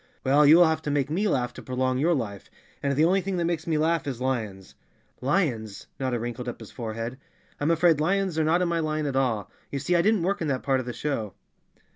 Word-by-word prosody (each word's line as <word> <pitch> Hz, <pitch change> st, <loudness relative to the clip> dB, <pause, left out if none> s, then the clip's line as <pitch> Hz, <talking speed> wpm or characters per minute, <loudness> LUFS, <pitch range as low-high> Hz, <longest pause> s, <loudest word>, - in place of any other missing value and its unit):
"Well, 145 Hz, +2 st, +5 dB
you 155 Hz, +3 st, +8 dB
will 175 Hz, -, +7 dB
have 160 Hz, -1 st, +1 dB
to 150 Hz, -, -4 dB
make 145 Hz, 0 st, 0 dB
me 200 Hz, +6 st, +1 dB
laugh 125 Hz, -8 st, 0 dB
to -, -, -9 dB
prolong 130 Hz, 0 st, -1 dB
your 165 Hz, +4 st, +3 dB
life, 100 Hz, -, -5 dB, 0.3 s
and 140 Hz, -1 st, 0 dB
the 155 Hz, +3 st, +4 dB
only 190 Hz, +3 st, +3 dB
thing 190 Hz, 0 st, -3 dB
that 170 Hz, -, 0 dB
makes 170 Hz, -1 st, -2 dB
me 160 Hz, -2 st, +1 dB
laugh 160 Hz, -1 st, +1 dB
is 130 Hz, -4 st, -3 dB
lions 110 Hz, -8 st, -3 dB, 0.5 s
I" -, -, -8 dB
"Lions!" 120 Hz, -, 0 dB
Notta 130 Hz, -2 st, -1 dB
wrinkled 120 Hz, +1 st, -4 dB
up -, -, -8 dB
his 110 Hz, -, -11 dB
forehead. 115 Hz, +2 st, -5 dB, 0.4 s
"I'm 145 Hz, -, 0 dB
afraid 165 Hz, -2 st, +4 dB
lions 190 Hz, 0 st, +1 dB
are -, -, +3 dB
not 165 Hz, +3 st, +2 dB
in -, -, +1 dB
my 170 Hz, -1 st, 0 dB
line 155 Hz, -1 st, -1 dB
at 140 Hz, -2 st, -2 dB
all. 120 Hz, -7 st, 0 dB, 0.2 s
You 140 Hz, -, -3 dB
see 150 Hz, +6 st, 0 dB
I 170 Hz, -, +4 dB
didn't 210 Hz, -1 st, +2 dB
work 200 Hz, +3 st, 0 dB
in 160 Hz, -, -1 dB
that 135 Hz, -3 st, -1 dB
part 135 Hz, -2 st, +2 dB
of 125 Hz, -, -5 dB
the -, -, -2 dB
show." 110 Hz, -10 st, -3 dB
145 Hz, 250 wpm, -26 LUFS, 125-165 Hz, 0.5 s, you